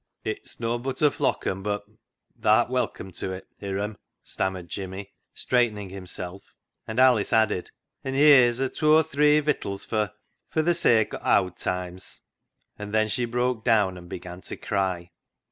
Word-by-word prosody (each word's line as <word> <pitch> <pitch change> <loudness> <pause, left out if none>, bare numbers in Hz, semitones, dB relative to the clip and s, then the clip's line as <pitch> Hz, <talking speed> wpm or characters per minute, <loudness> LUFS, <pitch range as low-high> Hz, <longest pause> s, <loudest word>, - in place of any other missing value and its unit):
*' - - -53
It's - - -13
nobbut 120 +4 -2
a 150 - +6
flock - - -1
un, 95 +1 -1
but 105 +1 -2 0.6
tha'rt 110 +2 +3
welcome 125 -6 -2
to 95 - -4
it, 95 - -8
Hiram," 100 +1 -3 0.2
stammered 95 -2 -2
Jimmy, 95 +1 -6 0.2
straightening 110 -6 0
himself, 90 0 -7 0.3
and 110 +2 -2
Alice 125 -5 +5
added, 110 -5 +2 0.2
" - - -54
An' 135 0 -3
heer's 130 -4 +6
a 135 - +1
tooathre 150 0 +4
vittles 100 -9 -2
fer 105 -2 -1 0.2
— - - -51
fer 160 - +1
th' 175 +2 +2
sake 115 -10 +3
o' - - -4
owd 90 -2 +2
toimes! 90 0 -5 0.3
" - - -45
And 105 +1 -5
then 110 0 +3
she 125 +2 0
broke 120 -1 -1
down 105 -6 +3
and 90 -1 -11
began 90 +1 -8
to - - -7
cry. 90 -3 -2
110 Hz, 165 wpm, -26 LUFS, 95-125 Hz, 0.6 s, a